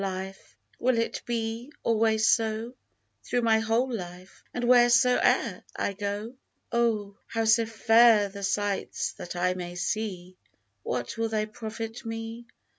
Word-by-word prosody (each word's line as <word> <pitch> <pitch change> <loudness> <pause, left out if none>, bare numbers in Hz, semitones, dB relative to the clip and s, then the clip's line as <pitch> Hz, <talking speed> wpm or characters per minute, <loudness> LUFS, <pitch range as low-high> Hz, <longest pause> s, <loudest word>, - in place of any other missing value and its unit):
Life! 190 0 -6 0.2
will 250 0 +2
it 230 - -1
be 230 +2 -3
always 220 -1 +2
so, 225 +1 +1 0.5
Through 245 - -1
my 220 -1 +4
whole 230 +3 0
life, 180 -2 -8
and 245 - -4
wheresoe'er 245 0 +4
I 200 - -1
go? 205 +3 -4 0.4
Oh! 215 -4 0
how 225 -1 -1
so 225 +1 +4
fair 225 -1 +5
the 200 0 -9
sights 200 0 -1
that 175 - -8
I 180 +1 +1
may 175 -1 -6
see 185 -1 -3 0.4
What 120 - -4
will 225 0 0
they 215 -1 0
profit 225 +1 -7
me 225 +1 -6
220 Hz, 135 wpm, -27 LUFS, 200-230 Hz, 0.5 s, fair